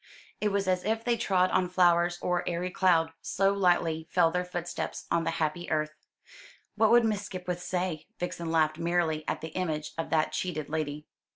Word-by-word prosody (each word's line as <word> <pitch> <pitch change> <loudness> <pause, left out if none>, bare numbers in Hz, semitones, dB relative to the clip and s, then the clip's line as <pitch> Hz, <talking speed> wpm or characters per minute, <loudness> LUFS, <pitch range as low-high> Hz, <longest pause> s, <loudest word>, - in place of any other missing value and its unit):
It 210 -1 +1
was 200 -1 0
as 185 -1 +1
if 220 +1 -1
they 240 0 +2
trod 185 -5 +2
on 185 -1 +2
flowers 175 -1 +3
or 180 -1 +1
airy 175 +1 -2
cloud, 165 -4 +3
so 195 +1 +1
lightly 175 -4 +1
fell 170 -3 +3
their 180 +1 0
footsteps 175 -1 -5
on 165 -1 +2
the - - +1
happy 160 +2 -2
earth. 155 -1 0 0.8
What 220 0 +3
would 240 0 +6
Miss 210 -2 0
Skipwith 180 -3 -5
say? 180 -3 -2
Vixen 170 -1 -4
laughed 155 -1 +2
merrily 170 -2 0
at - - -2
the 160 - -5
image 155 -3 -3
of 165 - -2
that 155 -1 +2
cheated 155 -1 -3
lady. 150 -1 -3
175 Hz, 185 wpm, -29 LUFS, 160-185 Hz, 0.8 s, would